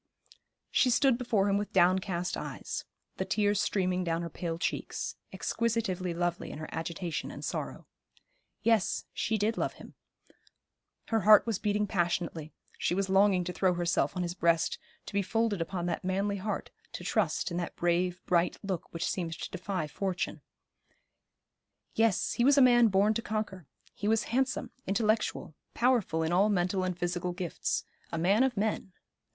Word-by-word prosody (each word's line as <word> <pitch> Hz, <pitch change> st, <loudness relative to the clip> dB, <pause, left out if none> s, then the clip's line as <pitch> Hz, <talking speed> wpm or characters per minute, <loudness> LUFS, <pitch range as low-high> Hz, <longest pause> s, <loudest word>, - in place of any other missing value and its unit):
She 255 Hz, -, +4 dB
stood 260 Hz, +1 st, +4 dB
before 230 Hz, -5 st, +1 dB
him 200 Hz, 0 st, +2 dB
with 205 Hz, -, -5 dB
downcast 180 Hz, 0 st, +2 dB
eyes, -, -, -5 dB, 0.3 s
the -, -, 0 dB
tears 205 Hz, -1 st, +2 dB
streaming 185 Hz, -2 st, 0 dB
down 170 Hz, -1 st, -1 dB
her 170 Hz, -, -5 dB
pale 165 Hz, -1 st, -3 dB
cheeks, -, -, -3 dB, 0.2 s
exquisitively 210 Hz, -6 st, -1 dB
lovely 175 Hz, 0 st, -2 dB
in -, -, -7 dB
her 155 Hz, 0 st, -6 dB
agitation 165 Hz, +1 st, -3 dB
and -, -, -7 dB
sorrow. -, -, -4 dB, 0.8 s
Yes, 225 Hz, -5 st, +2 dB
she 220 Hz, -, 0 dB
did 215 Hz, +2 st, 0 dB
love -, -, 0 dB
him; -, -, -13 dB, 1.2 s
her 225 Hz, -, +2 dB
heart 215 Hz, 0 st, +7 dB
was 225 Hz, -5 st, -1 dB
beating 210 Hz, 0 st, +1 dB
passionately; 170 Hz, -4 st, -1 dB, 0.3 s
she 175 Hz, -, +1 dB
was 195 Hz, 0 st, 0 dB
longing 195 Hz, -1 st, +4 dB
to 180 Hz, +1 st, -4 dB
throw 185 Hz, -1 st, +2 dB
herself 175 Hz, +1 st, 0 dB
on 180 Hz, -, 0 dB
his 175 Hz, 0 st, -2 dB
breast, 170 Hz, -2 st, +1 dB, 0.3 s
to -, -, -9 dB
be 200 Hz, -, +2 dB
folded 220 Hz, -1 st, 0 dB
upon 175 Hz, +1 st, -3 dB
that 170 Hz, -2 st, -2 dB
manly 195 Hz, +2 st, 0 dB
heart, 205 Hz, +1 st, -4 dB, 0.3 s
in 175 Hz, -, -9 dB
trust 185 Hz, -3 st, 0 dB
in 170 Hz, -, -2 dB
that 175 Hz, -, -3 dB
brave, 175 Hz, +1 st, 0 dB
bright 175 Hz, 0 st, +2 dB
look 190 Hz, -4 st, -4 dB
which 165 Hz, -, -2 dB
seemed 170 Hz, -3 st, -2 dB
to -, -, -6 dB
defy 185 Hz, -2 st, -3 dB
fortune. 185 Hz, +4 st, -3 dB, 1.5 s
Yes, 225 Hz, -4 st, +2 dB
he 235 Hz, -, +1 dB
was 280 Hz, +3 st, +5 dB
a -, -, +7 dB
man 240 Hz, -2 st, +6 dB
born 200 Hz, +1 st, +3 dB
to 230 Hz, -, -2 dB
conquer; 210 Hz, -7 st, -4 dB, 0.3 s
he 205 Hz, -, -4 dB
was 220 Hz, 0 st, +3 dB
handsome, 265 Hz, +1 st, 0 dB, 0.2 s
intellectual, 215 Hz, -4 st, 0 dB, 0.2 s
powerful 235 Hz, -10 st, +2 dB
in 160 Hz, -, -1 dB
all 195 Hz, +4 st, +4 dB
mental 185 Hz, -1 st, +1 dB
and 185 Hz, -1 st, -2 dB
physical 175 Hz, 0 st, -2 dB
gifts. 175 Hz, -2 st, -2 dB, 0.3 s
A 165 Hz, -, -2 dB
man 190 Hz, +7 st, +3 dB
of 265 Hz, -4 st, +2 dB
men. 205 Hz, -2 st, -1 dB
190 Hz, 170 wpm, -30 LUFS, 175-215 Hz, 1.5 s, heart